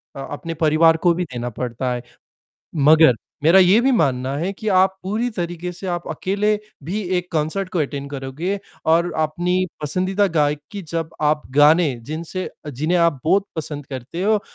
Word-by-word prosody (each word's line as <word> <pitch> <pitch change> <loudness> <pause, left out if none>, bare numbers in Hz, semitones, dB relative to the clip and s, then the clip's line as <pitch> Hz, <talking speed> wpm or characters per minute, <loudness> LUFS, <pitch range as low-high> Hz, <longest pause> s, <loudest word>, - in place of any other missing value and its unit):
अ, - - -7
अपने 165 +3 -5
परिवार 160 +1 +4
को 175 - +6
भी 180 +2 -2
देना 120 0 -3
पड़ता 125 +2 -3
है, 120 -1 -5 0.7
मगर 155 -2 +6 0.3
मेरा 170 +5 +7
ये 190 +4 +6
भी 265 +3 +3
मानना 135 - +1
है 180 +5 -1
कि, 215 +2 -5
आप 190 -1 +3
पूरी 215 +6 -1
तरीके 175 -3 -4
से 180 +2 -8
आप 175 -1 -3
अकेले 200 +6 0 0.3
भी 195 +7 -2 0.2
एक 180 0 -7
कॉन्सर्ट 160 +5 -1
को 180 - -2
अटेंड 140 -1 -2
करोंगे 145 +8 -3 0.3
और 170 +1 +2
अपनी 175 +4 0 0.2
पसंदीदा 185 +7 +1
गायक 145 -1 +2
की 200 -1 -5
जब 165 0 -3
आप 150 0 +2
गाने 150 0 +5
जिनसे 165 +7 -5
अ, 150 - -10
जिन्हें 155 +7 0
आप 170 -6 +2
बहुत 195 +5 +3
पसंद 145 -2 -5
करते 135 +5 -6
हो, 210 +1 +3
165 Hz, 175 wpm, -21 LUFS, 145-185 Hz, 0.7 s, मेरा